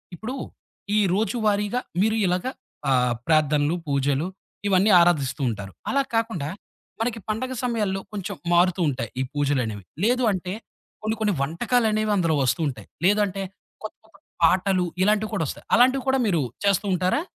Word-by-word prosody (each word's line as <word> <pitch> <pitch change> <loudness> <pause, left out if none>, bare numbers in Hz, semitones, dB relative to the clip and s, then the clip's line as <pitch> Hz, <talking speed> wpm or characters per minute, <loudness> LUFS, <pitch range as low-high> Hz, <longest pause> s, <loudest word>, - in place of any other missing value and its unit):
ఇప్పుడు 235 +9 -5 0.6
ఈ - - +5 0.2
రోజువారీగా 215 +1 0 0.2
మీరు 220 +2 +2
ఇలాగ 180 +3 0 0.4
ఆహ్, 125 -2 +3
ప్రార్థనలు, 155 0 +3
పూజలు, 140 +3 +1 0.4
ఇవన్నీ 195 +2 +4
ఆరాధిస్తూ 150 -5 +2
ఉంటారు. 100 -3 -6 0.2
అలా 275 - +2
కాకుండా 220 -11 -1 0.5
మనకి 225 0 -1
పండగ 255 +5 -2
సమయాల్లో 210 -6 0
కొంచెం 200 -1 -4 0.2
మారుతూ 175 +1 +3
ఉంటాయి 120 -5 -3
ఈ - - +2
పూజలనేవి. 130 -9 -1 0.2
లేదు 250 +3 +2
అంటే, 185 -1 -3 0.5
కొన్ని 215 +1 0
కొన్ని 210 -2 +1
వంటకాలనేవి 215 - +1
అందులో 165 -5 +2
వస్తూ 130 +6 +1
ఉంటాయి. 130 - -6 0.2
లేదంటే 200 -1 +2 0.4
కొత్త 215 - -9 0.4
పాటలు 185 +1 +3 0.2
ఇలాంటివి 215 +2 +2
కూడా 165 - 0
ఒస్తాయి. - - -7
అలాంటివి 255 +2 +4
కూడా 265 0 +3
మీరు 170 -7 +2 0.2
చేస్తూ 200 0 +2
ఉంటారా? 185 - +1
190 Hz, 140 wpm, -24 LUFS, 155-215 Hz, 0.6 s, ఈ